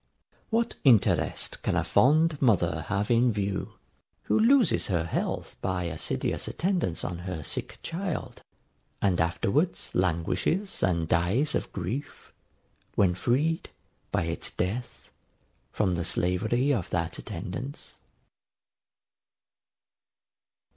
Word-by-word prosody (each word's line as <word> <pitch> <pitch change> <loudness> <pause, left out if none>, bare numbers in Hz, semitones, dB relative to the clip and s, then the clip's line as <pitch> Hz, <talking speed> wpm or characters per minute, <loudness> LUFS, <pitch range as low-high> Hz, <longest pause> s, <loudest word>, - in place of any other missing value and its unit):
What 230 +1 +1
interest 120 -7 +3
can - - 0
a - - +2
fond 155 +3 +3
mother 85 - +2
have 105 +2 0
in 120 +1 +4
view, 100 -2 -2 0.5
who - - +2
loses 250 +2 +4
her 85 -4 +1
health 85 - -3
by 90 -1 -1
assiduous 80 -2 -1
attendance 175 - -1
on 85 -1 -4
her 90 -3 -5
sick - - -4
child, 175 0 -4 0.6
and 95 -4 +2
afterwards 100 - 0
languishes 95 - 0
and 85 -3 +1
dies 100 - +2
of - - -2
grief, 100 +10 -5 0.6
when 95 -3 +4
freed, 145 - 0 0.4
by - - +1
its 85 0 -3
death, 110 +7 -4 0.6
from 95 -4 +1
the 85 0 -1
slavery 110 - +1
of 100 -10 -2
that 85 -1 -2
attendance? 130 +10 -6
100 Hz, 110 wpm, -28 LUFS, 85-145 Hz, 0.6 s, in